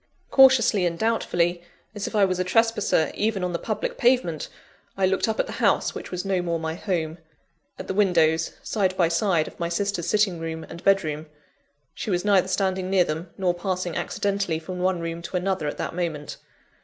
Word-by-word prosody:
Cautiously 250 -8 +6
and 170 -1 -3
doubtfully, 175 -6 0 0.3
as 205 -2 -4
if - - -6
I 205 -2 +5
was 185 -1 -1
a - - +2
trespasser 210 -5 +2
even 210 -3 -1
on 180 -1 -1
the 170 - -1
public 215 - -3
pavement, 235 - +2 0.5
I 195 - +3
looked 190 +3 +1
up 220 - -2
at - - +2
the - - -8
house - - +2
which - - -7
was 180 +1 -4
no 190 -2 +1
more 170 -1 -1
my 160 0 -3
home 165 -2 -3 0.6
at - - -7
the - - -3
windows, 165 -5 +2
side 190 -4 0
by 170 -3 +3
side, 170 -2 +1
of - - -12
my 170 0 -1
sister's 180 -1 -1
sitting 205 -3 +2
room 160 0 -5
and 170 - -10
bed 195 -1 +4
room. 155 0 -4 0.7
She - - -5
was 180 0 0
neither 195 -3 +4
standing 190 -1 -1
near 190 -2 +4
them, 165 +2 -4
nor 185 -2 +1
passing 180 -1 -3
accidentally 195 -5 -1
from 180 +3 -7
one 180 -1 0
room 165 0 -4
to 175 +2 -3
another 180 -4 -1
at 145 - -4
that - - -4
moment. 165 -4 -4
180 Hz, 205 wpm, -24 LUFS, 170-195 Hz, 0.7 s, Cautiously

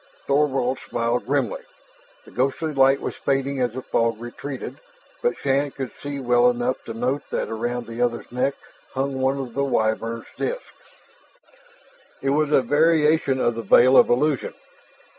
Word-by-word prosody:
Thorvald 135 -3 +1
smiled 120 +1 -2
grimly. 135 -5 0 0.6
The - - -15
ghostly 140 +5 -1
light 135 0 +4
was - - -3
fading 135 0 -1
as 120 -2 0
the 130 +1 -6
fog 115 -1 0
retreated, 125 +3 -7 0.4
but 480 - 0
Shann 140 +1 +1
could 130 -4 -6
see 145 -1 -6
well 125 -1 +4
enough 120 +1 -1
to 115 - -6
note 125 +5 -1
that - - -2
around 120 +2 -3
the 115 +1 -6
other's 120 -1 -1
neck 125 +3 0 0.4
hung 135 0 -1
one 135 +1 +1
of 130 -4 -5
the 140 - 0
Wyvern 115 -2 -1
disks. - - -4 1.5
"It 135 - 0
was 150 +1 +1
a 140 - +5
variation 150 0 +3
of 120 - +2
the 115 - -4
veil 125 +5 +6
of - - +7
illusion. 140 +2 +1
130 Hz, 160 wpm, -23 LUFS, 120-140 Hz, 1.5 s, of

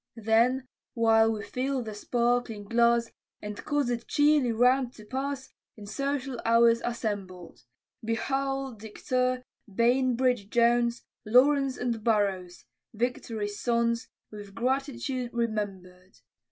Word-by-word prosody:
Then, 235 +4 +2 0.3
while 225 -1 +4
we 215 -2 -4
fill 255 +4 -2
the 215 -1 -6
sparkling 235 0 -1
glass, 235 +2 +2 0.3
And 210 0 -7
cause 290 -3 0
it 235 -1 -4
cheerly 290 -4 +3
round 250 +2 +2
to 215 - -14
pass, 270 +3 -4 0.2
In 210 - -10
social 270 +3 -3
hours 230 0 +4
assembled; 200 - -5 0.4
Be 225 +1 0
Hull, 270 +1 -2
Decatur, 250 +4 -2 0.3
Bainbridge, 245 0 +2
Jones, 235 +1 +2 0.2
Lawrence 270 +4 +3
and 235 -3 -2
Burrows 195 -5 0 0.3
Victory's 220 -3 -3
sons, 235 -1 0 0.2
With 205 -2 -10
gratitude 255 +1 -2
remember'd. 195 -5 -4
235 Hz, 115 wpm, -28 LUFS, 215-255 Hz, 0.4 s, while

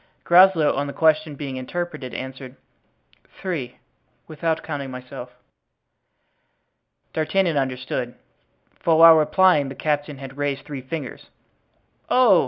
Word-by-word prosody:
Groslow, 175 -3 +5
on 140 +1 -2
the 140 - -6
question 155 -1 +2
being 135 -2 -6
interpreted, 150 0 -5
answered, 130 0 -7 0.8
"Three, 155 -10 -4 0.5
without 160 +1 -2
counting 140 -4 -5
myself." 125 -1 -9 1.8
D'Artagnan 170 +2 0
understood, 130 -2 -3 0.6
for 165 -1 +2
while 165 0 +9
replying 155 -1 +3
the 135 - -8
captain 145 -1 -2
had 135 0 -10
raised 145 -1 -2
three 145 -3 -6
fingers. 135 +1 -7 0.8
"Oh!" 245 -8 +5
145 Hz, 110 wpm, -22 LUFS, 135-165 Hz, 1.8 s, while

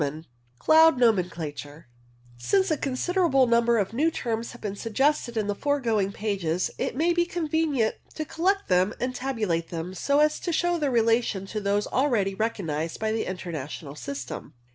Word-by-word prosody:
X - - 0
CHAPTER 155 +3 -9
X - - -31 0.3
CLOUD 320 - +6
NOMENCLATURE 170 -9 -1 0.5
Since 380 - +1
a 310 - +2
considerable 275 +1 +2
number 235 0 +3
of 205 0 -1
new 300 +7 +2
terms 230 -6 -3
have 240 - -13
been 205 -2 -4
suggested 240 +2 0
in 215 - +1
the 205 - -1
foregoing 230 -6 0
pages, 190 -5 -1
it - - -2
may 335 +5 +2
be 345 0 +3
convenient 320 -8 0 0.2
to 310 - -3
collect 385 +6 0
them 185 +3 +2
and 255 +1 -2
tabulate 215 -12 -2
them, 170 +2 -5
so 280 +9 +1
as 300 0 +3
to 350 - -3
show 345 +1 +1
their 290 -2 +1
relation 230 -4 +1
to 210 +2 -4
those 200 +1 +1
already 235 -8 +1
recognized 170 -7 -2
by 220 0 0
the 220 0 -1
International 160 -5 -6
system. 140 -5 -7
225 Hz, 175 wpm, -26 LUFS, 185-285 Hz, 0.5 s, CLOUD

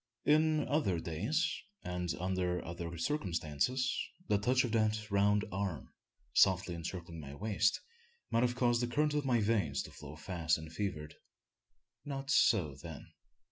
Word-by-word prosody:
Is 155 +1 +4
other 140 - +1
days, 105 - 0 0.4
and 90 -1 -2
under 90 -1 -1
other 85 0 -5
circumstances, 95 - 0 0.3
the 105 - +3
touch 125 +5 +3
of 120 - -2
that 110 -1 +1
round 100 +1 +3
arm, 95 -7 -3 0.4
softly 90 -1 +4
encircling 85 0 -6
my 70 -2 -8
waist, 105 +3 +1 0.5
might 115 - +3
have 125 0 +2
caused 120 -1 +2
the 120 - +1
current 150 +4 +1
of 150 -1 0
my 120 -4 +3
veins 100 -11 +1
to - - -10
flow 75 0 -10
fast 80 0 0
and 80 0 -9
fevered. 85 -6 -4 0.9
Not 140 -1 -4
so 95 - +4
then. 80 -2 -9
100 Hz, 145 wpm, -34 LUFS, 85-120 Hz, 0.9 s, Is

